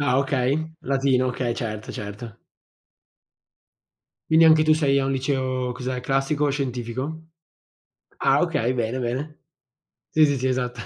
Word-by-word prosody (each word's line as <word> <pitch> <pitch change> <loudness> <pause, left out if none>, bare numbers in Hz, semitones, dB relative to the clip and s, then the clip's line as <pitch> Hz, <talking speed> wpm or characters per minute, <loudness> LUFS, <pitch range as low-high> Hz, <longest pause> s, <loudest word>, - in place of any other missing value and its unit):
Ah 130 -2 +2
okay, 140 +3 0
latino, 135 -2 +1
okay, 125 -1 -2
certo, 110 -2 -5
certo. 105 +1 -8 1.9
Quindi 160 +1 +6
anche 160 -1 +6
tu 155 0 +5
sei 140 -3 +2
a 135 - 0
un 135 - 0
liceo, 130 -2 -1
cos'è, 125 +1 -4
classico 135 +3 0
o - - +1
scientifico? 135 +3 -4 0.9
Ah 135 +1 +3
okay, 145 -8 0
bene, 120 +1 -2
bene. 130 +6 -4 0.7
Sì, 155 0 +4
sì, 145 -2 +2
sì, 130 - -2
esatto. 125 -2 -1
130 Hz, 140 wpm, -24 LUFS, 125-145 Hz, 1.9 s, Quindi